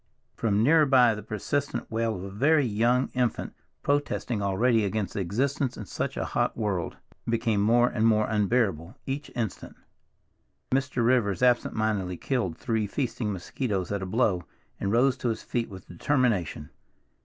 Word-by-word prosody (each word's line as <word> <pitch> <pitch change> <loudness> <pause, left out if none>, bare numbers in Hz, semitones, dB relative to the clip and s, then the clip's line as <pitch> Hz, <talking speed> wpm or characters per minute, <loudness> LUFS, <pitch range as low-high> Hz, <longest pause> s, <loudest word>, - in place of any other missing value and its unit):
From 105 -2 +1
nearer 155 +3 +5
by 125 -4 +5
the 105 - -6
persistent 140 +9 -3
wail 115 0 0
of 90 - -6
a 100 - -7
very 140 +8 +3
young 120 +4 +2
infant, 125 -3 -1 0.3
protesting 140 -6 0
already 110 +4 +2
against 105 0 -2
existence 125 - -1
in 105 - -6
such - - -4
a - - -1
hot - - -1
world, 100 -6 -2 0.3
became 115 -3 +1
more 120 +3 +4
and 115 -2 +1
more 110 -1 +3
unbearable 105 - 0
each 140 +2 -4
instant. 110 -6 -4 1.0
Mr. 130 -2 +1
Rivers 120 -4 +2
absent 125 -1 +3
mindedly 100 -5 -1
killed 115 - -2
three 110 -4 -1
feasting 115 -2 -2
mosquitoes 95 0 -3
at 100 -1 -1
a 95 - -4
blow, 95 -4 +1 0.4
and 100 - -1
rose 125 +3 +3
to 125 - -1
his 115 - -3
feet 120 -1 -2
with 95 -3 -11
determination. 100 - 0
115 Hz, 155 wpm, -27 LUFS, 100-125 Hz, 1.0 s, nearer